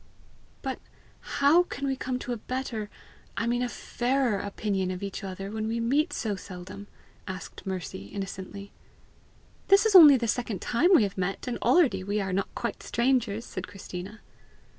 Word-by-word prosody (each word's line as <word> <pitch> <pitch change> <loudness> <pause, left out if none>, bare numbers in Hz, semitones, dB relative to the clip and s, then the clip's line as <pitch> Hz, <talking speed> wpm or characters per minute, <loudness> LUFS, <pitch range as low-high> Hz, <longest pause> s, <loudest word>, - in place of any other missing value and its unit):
"But - - -3 0.6
how 290 +5 +6
can 280 -6 -4
we 270 -1 0
come 255 -1 -3
to 250 -1 -4
a - - -4
better 230 -3 -4 0.5
I 230 - 0
mean 240 +1 +1
a 250 - 0
FAIRER 245 -3 0
opinion 200 -2 -2
of 185 +1 -4
each 200 +1 -5
other, 195 +1 -5
when 220 0 -3
we 230 +1 -1
meet 280 +8 +2
so 210 -3 -2
seldom?" 190 +2 -9 0.4
asked 185 0 -7
Mercy 175 - -5
innocently. 195 - -7 1.0
"This 395 +2 +6
is 440 - +3
only 305 -7 +10
the 235 -1 -2
second 225 -4 -1
time 250 +9 +2
we 235 - +6
have 200 -1 -3
met, 190 +6 -2
and 245 - -2
already 325 - +3
we 205 +2 -1
are 195 -2 -2
not 195 +1 0
quite - - -3
strangers!" 235 -1 0
said - - -6
Christina. 195 +1 -8
215 Hz, 170 wpm, -28 LUFS, 195-255 Hz, 1.0 s, only